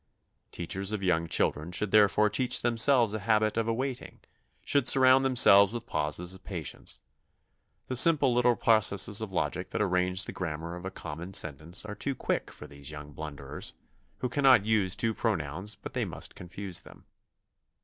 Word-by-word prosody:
Teachers 95 Hz, +3 st, -3 dB
of 105 Hz, -2 st, -4 dB
young 85 Hz, -3 st, +1 dB
children 80 Hz, 0 st, -1 dB
should 95 Hz, +3 st, -3 dB
therefore 105 Hz, 0 st, +4 dB
teach 125 Hz, +4 st, 0 dB
themselves 120 Hz, -1 st, +3 dB
a 110 Hz, -, -3 dB
habit 110 Hz, 0 st, +1 dB
of 115 Hz, 0 st, -1 dB
awaiting, 125 Hz, +3 st, -4 dB, 0.5 s
should 140 Hz, -3 st, +1 dB
surround 130 Hz, 0 st, +6 dB
themselves 105 Hz, -6 st, +6 dB
with 120 Hz, -1 st, -6 dB
pauses 80 Hz, +3 st, -3 dB
of 95 Hz, -, -14 dB
patience. 85 Hz, -6 st, -5 dB, 0.9 s
The 130 Hz, -, -4 dB
simple 140 Hz, -2 st, +6 dB
little 125 Hz, 0 st, +3 dB
processes 110 Hz, -2 st, +2 dB
of 110 Hz, -3 st, -5 dB
logic 90 Hz, -, -3 dB
that -, -, -4 dB
arrange 90 Hz, -1 st, +1 dB
the -, -, -7 dB
grammar 85 Hz, -1 st, -5 dB
of 90 Hz, +1 st, -10 dB
a -, -, -3 dB
common 85 Hz, 0 st, -8 dB
sentence 80 Hz, +6 st, -1 dB
are 105 Hz, -, -6 dB
too 140 Hz, +5 st, -4 dB
quick -, -, -3 dB
for -, -, -12 dB
these 70 Hz, 0 st, -9 dB
young 75 Hz, -1 st, -9 dB
blunderers, 70 Hz, -3 st, -7 dB, 0.5 s
who 125 Hz, -, 0 dB
cannot 130 Hz, -6 st, +4 dB
use 105 Hz, -4 st, +1 dB
two 115 Hz, -1 st, -1 dB
pronouns 95 Hz, -2 st, -3 dB
but -, -, -10 dB
they -, -, -1 dB
must -, -, -6 dB
confuse 90 Hz, +1 st, -6 dB
them. -, -, -17 dB
100 Hz, 170 wpm, -28 LUFS, 85-115 Hz, 0.9 s, surround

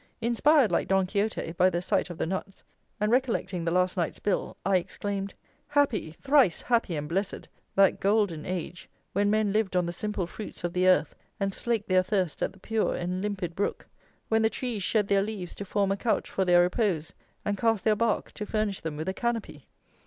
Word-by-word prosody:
Inspired, 240 Hz, +3 st, +4 dB
like -, -, +1 dB
Don 190 Hz, -1 st, +3 dB
Quixote, 200 Hz, -2 st, -1 dB
by 180 Hz, +2 st, +4 dB
the 175 Hz, -, -1 dB
sight 190 Hz, +2 st, 0 dB
of 175 Hz, -, -7 dB
the -, -, -1 dB
nuts, 190 Hz, +3 st, -5 dB, 0.4 s
and 210 Hz, +1 st, +1 dB
recollecting 235 Hz, -8 st, 0 dB
the 165 Hz, -, 0 dB
last 180 Hz, +1 st, +2 dB
night's 175 Hz, -3 st, -1 dB
bill, 205 Hz, -, -2 dB
I 195 Hz, -1 st, +4 dB
exclaimed: 195 Hz, +2 st, -4 dB, 0.3 s
"Happy! 285 Hz, -, +1 dB
thrice 260 Hz, -, +3 dB
happy 230 Hz, -8 st, +1 dB
and 150 Hz, 0 st, -3 dB
blessed, 190 Hz, +5 st, -2 dB, 0.3 s
that 195 Hz, -1 st, +4 dB
golden 200 Hz, -6 st, +1 dB
age, 180 Hz, -1 st, -5 dB, 0.2 s
when 205 Hz, +1 st, +2 dB
men 215 Hz, -1 st, +2 dB
lived 215 Hz, -3 st, 0 dB
on 180 Hz, -1 st, +3 dB
the 170 Hz, -, -3 dB
simple 205 Hz, 0 st, -2 dB
fruits 205 Hz, +3 st, -9 dB
of 175 Hz, 0 st, -2 dB
the 185 Hz, 0 st, +2 dB
earth 180 Hz, -4 st, +4 dB, 0.3 s
and 195 Hz, -1 st, -1 dB
slaked 230 Hz, -2 st, -1 dB
their 185 Hz, -1 st, +4 dB
thirst 185 Hz, -3 st, -1 dB
at -, -, 0 dB
the 195 Hz, -, -19 dB
pure 220 Hz, +2 st, 0 dB
and 180 Hz, +1 st, -2 dB
limpid 190 Hz, -5 st, -3 dB
brook! 200 Hz, -, -2 dB, 0.4 s
when 225 Hz, 0 st, +2 dB
the 220 Hz, -, +4 dB
trees 235 Hz, -3 st, -3 dB
shed 205 Hz, +2 st, +1 dB
their 200 Hz, -1 st, +3 dB
leaves 200 Hz, -4 st, -4 dB
to 200 Hz, -, -7 dB
form 200 Hz, 0 st, +1 dB
a 195 Hz, -, 0 dB
couch 225 Hz, -, -1 dB
for 190 Hz, -, 0 dB
their 175 Hz, -1 st, +6 dB
repose, 180 Hz, -4 st, 0 dB, 0.3 s
and 205 Hz, -, 0 dB
cast 225 Hz, -4 st, +2 dB
their 215 Hz, -1 st, +3 dB
bark 225 Hz, 0 st, 0 dB
to 210 Hz, -, -6 dB
furnish 215 Hz, -3 st, -1 dB
them 155 Hz, -2 st, -4 dB
with 155 Hz, +3 st, -4 dB
a 190 Hz, -, 0 dB
canopy! 235 Hz, 0 st, -3 dB
195 Hz, 205 wpm, -28 LUFS, 180-215 Hz, 0.4 s, their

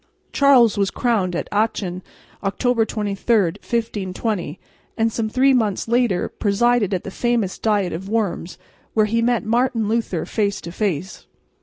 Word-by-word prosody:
Charles 250 Hz, -7 st, +5 dB
was 200 Hz, -1 st, +2 dB
crowned 200 Hz, -8 st, 0 dB
at -, -, -3 dB
Aachen, 205 Hz, -4 st, -1 dB, 0.4 s
October 230 Hz, +3 st, +1 dB
23, 210 Hz, +2 st, -1 dB, 0.2 s
1520, 205 Hz, -6 st, -3 dB, 0.4 s
and 225 Hz, 0 st, +2 dB
some 220 Hz, -2 st, -1 dB
three 265 Hz, +4 st, +3 dB
months 220 Hz, -6 st, 0 dB
later 235 Hz, -5 st, +1 dB
presided 225 Hz, +1 st, +1 dB
at 185 Hz, -2 st, -1 dB
the 195 Hz, -, -7 dB
famous 235 Hz, -4 st, -1 dB
diet 205 Hz, -4 st, +1 dB
of 190 Hz, +4 st, -6 dB
Worms, 205 Hz, -6 st, -2 dB, 0.4 s
where 215 Hz, -1 st, +4 dB
he 230 Hz, +2 st, 0 dB
met 240 Hz, -1 st, +1 dB
Martin 230 Hz, -1 st, +1 dB
Luther 220 Hz, -6 st, -1 dB
face 205 Hz, -2 st, -1 dB
to 170 Hz, -, -7 dB
face. 185 Hz, -2 st, -3 dB
215 Hz, 145 wpm, -21 LUFS, 195-235 Hz, 0.4 s, Charles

